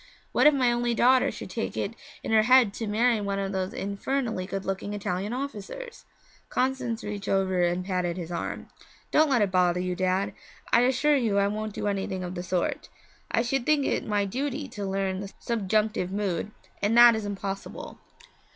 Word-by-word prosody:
What - - +5
if 300 - +7
my 250 -3 +3
only 240 0 0
daughter 255 +2 +4
should - - -8
take - - -3
it - - -2 0.3
in - - -3
her 220 -1 +6
head 245 -2 +5
to 225 - -4
marry 225 +1 +2
one 200 -1 -2
of 195 0 -2
these 190 +3 -3
infernally 200 0 -2
good 195 0 -4
looking 195 +1 -3
Italian 200 0 -3
officers?' 280 - -6 0.4
Constance 255 -3 -1
reached 205 -1 -5
over 190 -2 +1
and 175 +1 +1
patted 180 -2 -1
his 175 -1 -6
arm. 170 - -4 0.4
'Don't 310 0 +4
let 245 -6 +3
it 195 - -1
bother 180 -1 +3
you, 180 0 -2
Dad; 185 +2 0 0.4
I 235 - +7
assure 265 +4 +3
you 225 -7 +1
I 200 0 +3
won't 215 +1 -3
do - - -3
anything 195 -2 -2
of 180 0 -5
the 175 - -4
sort. 180 0 -2 0.4
I 230 - +1
should 250 0 -1
think 300 -3 +3
it - - 0
my 205 -1 0
duty 275 +6 -3
to 205 -3 -5
learn 190 -1 -1
the 200 0 -6
subjunctive 215 -3 0
mood, 195 -2 -2 0.3
and 210 +3 +2
that 240 -1 +9
is 220 - -3
impossible.' 195 -1 -6
205 Hz, 190 wpm, -27 LUFS, 190-240 Hz, 0.4 s, that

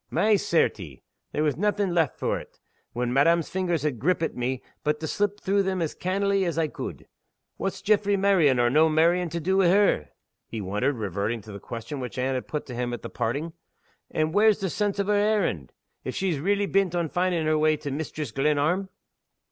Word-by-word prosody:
"My 215 0 +3
certie! 95 - 0 0.3
there 150 - 0
was 150 -3 +1
naething 205 -1 0
left 165 -5 +1
for't, - - -3 0.3
when 120 0 -2
madam's 165 +4 +3
fingers 175 -5 -1
had 145 -6 -1
grippit 165 +3 +1
me, 125 +1 -3 0.2
but 150 0 0
to 160 - -4
slip 205 +4 -1
through 200 +1 +1
them 190 -1 -1
as 165 -3 -1
cannily 195 +1 0
as 170 -3 -2
I 160 -2 +1
could. - - -7 0.5
What's 195 - -3
Jaffray's 205 -1 +3
marrying, 185 -9 +4
or 120 0 +3
no' 155 +3 +5
marrying, 170 +3 +3
to 170 +1 -3
do 190 +4 +1
wi' 190 -2 +4
her?" 190 - +3 0.4
he 115 - -5
wondered, 105 +8 -1
reverting 105 +2 -2
to 105 - -11
the 100 - -8
question 115 +6 -6
which 125 -1 -6
Anne 130 +1 0
had 130 - -3
put 150 - -4
to 125 - -8
him 120 0 -2
at - - -9
parting. 145 +8 -2 0.6
"And 155 0 -1
whar's 215 +1 +4
the 190 -4 -2
sense 205 +2 -1
o' - - +3
her 205 +1 0
errand, 205 - +1 0.3
if - - -5
she's 180 -7 -1
reely 200 +6 +1
bent 195 -3 +1
on 170 -2 0
finding 175 0 0
her 155 0 +2
way 155 0 +3
to 145 -1 -5
Mistress 150 -2 -4
Glenarm?" 150 - +1
160 Hz, 200 wpm, -26 LUFS, 130-190 Hz, 0.6 s, no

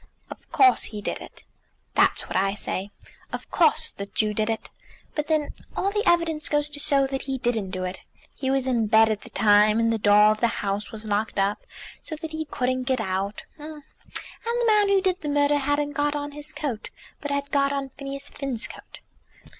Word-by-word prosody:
"Of - - -12
course 390 -1 +5
he 210 - -5
did 205 - -4
it." - - -12 0.5
"That's - - +3
what - - -6
I 195 +2 +1
say. 195 -1 -2 0.4
Of - - -7
course 325 -4 +3
the 200 - -7
Jew 215 +1 +1
did 215 +1 0
it. 225 - -3 0.4
But 300 -1 -2
then 310 -2 0 0.2
all 395 - +1
the 420 0 0
evidence 335 -3 +2
goes 295 0 +1
to 290 - -1
show 280 -2 +4
that 270 0 -3
he 270 -1 -2
didn't 235 -6 -1
do 185 -1 -4
it. 185 +1 -5 0.3
He 265 - -3
was 270 -1 +1
in 235 -4 +1
bed 220 +1 +5
at 210 -1 -2
the - - -10
time; 210 +1 +4
and 230 0 +2
the 225 - -1
door 210 +1 +6
of 215 - -2
the 235 - +3 0.2
house 200 +1 -2
was 220 0 -7
locked 210 +1 -1
up 200 +1 0 0.3
so 315 - -6
that 315 +1 -7
he 315 0 -3
couldn't 255 -2 -1
get 260 0 +1
out; 195 0 -2 0.2
and 300 0 -9 0.6
the 475 +1 -1
man 420 -2 +4
who 395 -1 +4
did 370 -1 0
the 300 - -3
murder 290 0 +3
hadn't 290 +1 0
got 290 0 0
on 290 0 -4
his 295 +1 -6
coat, 265 -9 -4 0.3
but 290 - -5
had 280 0 -2
got 280 -1 +2
on 275 -1 -3
Phineas 275 +1 -7
Finn's 270 -5 -2
coat." - - -12
270 Hz, 210 wpm, -25 LUFS, 215-295 Hz, 0.6 s, door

